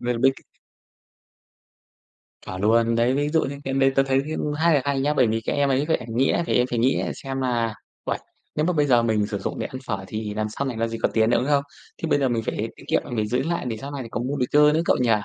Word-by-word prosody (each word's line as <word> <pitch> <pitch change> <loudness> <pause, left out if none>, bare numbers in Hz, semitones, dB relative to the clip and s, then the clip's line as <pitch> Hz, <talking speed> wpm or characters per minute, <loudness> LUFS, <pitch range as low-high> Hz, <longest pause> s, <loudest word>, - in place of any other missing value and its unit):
Mình 120 -1 -1
biết 135 +1 +5
c - - -15 2.0
Chuẩn 95 0 -5
luôn. 115 +2 +3
Đấy, 120 +3 +2
ví 145 +1 +1
dụ 160 +1 +2
như 140 +1 -3
cái 135 - -2
đấy 135 0 +4
tớ 135 - +6
thấy, 135 0 +1 0.2
ưm, 150 - -2
khá 170 - +5
là 140 - +4
hay 140 -1 0
nhá, 145 +2 +1
bởi 130 -4 +4
vì 110 +1 0
các - - -1
em 140 -1 +2
ấy, 135 +2 +2
các 160 - +2
ẻm 120 - -9
nghĩ 130 +2 +3
là - - +2
em 125 - +2
phải 120 - -1
nghĩ 130 +3 +2
xem 135 -1 -5
là 120 -4 0 0.3
"Uầy, - - -1 0.4
nếu 150 - +1
mà 180 - +2
bây 150 -3 +2
giờ 120 -4 +4
mình 110 -3 +1
sử 105 -1 -3
dụng 95 - -4
để - - -2
ăn 130 - -7
phở 95 -3 -3
thì 105 +1 -4
làm 110 0 -1
sau 140 +6 -4
này 125 -4 -3
làm 115 0 0
gì 115 0 -5
có - - +3
tiền 110 0 +3
nữa, - - +4
đúng 125 - -1
không? 140 -1 +3 0.4
Thế 165 - -1
bây 145 - +3
giờ 135 - +2
mình 115 -2 0
phải - - -3
tiết - - -14
kiệm, - - +2
mình - - -6
phải 105 -1 0
giữ 125 +4 0
lại 170 +3 -2
để 110 - -3
sau 140 +5 -7
này 140 -3 -5
có - - -3
mua 135 +4 -2
đồ 130 - +1
chơi 150 0 +6
nữa," 160 - +2
cậu - - +3
nhi? 120 -2 +2
130 Hz, 295 wpm, -24 LUFS, 115-140 Hz, 2.0 s, tớ